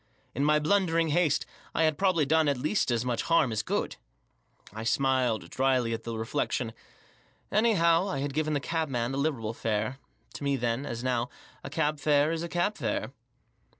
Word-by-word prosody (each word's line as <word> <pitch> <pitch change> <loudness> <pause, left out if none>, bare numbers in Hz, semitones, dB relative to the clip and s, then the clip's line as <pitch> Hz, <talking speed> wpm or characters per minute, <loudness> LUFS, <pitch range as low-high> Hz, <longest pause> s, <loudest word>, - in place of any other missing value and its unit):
In 140 - -1
my 150 +1 +4
blundering 165 0 +2
haste 150 -2 +2 0.3
I 165 - +3
had 155 -1 +3
probably 185 -3 +2
done 160 +2 +3
at 140 -2 +2
least 155 +8 0
as 120 0 0
much 120 -2 0
harm 165 -7 +3
as 110 -1 0
good. - - -2 0.8
I 110 +1 -6
smiled, 125 -1 +1
drily, 130 -3 +1
at 115 - -5
the 115 -1 -4
reflection. 115 +1 -2 0.8
Anyhow, 195 -5 +3
I 185 - -2
had 140 0 -2
given 155 +1 0
the - - +1
cabman 135 -6 -2
a - - -2
liberal 135 -7 -1
fare. 110 +3 -2 0.3
To - - -7
me, 140 -1 +1
then, 120 +2 -1
as 120 +1 -5
now, 125 -1 0 0.3
a - - -6
cab 150 0 0
fare 145 +1 +3
is 165 -1 -2
a 170 - -4
cab 175 +5 0
fare. - - -2
140 Hz, 185 wpm, -28 LUFS, 120-160 Hz, 0.8 s, my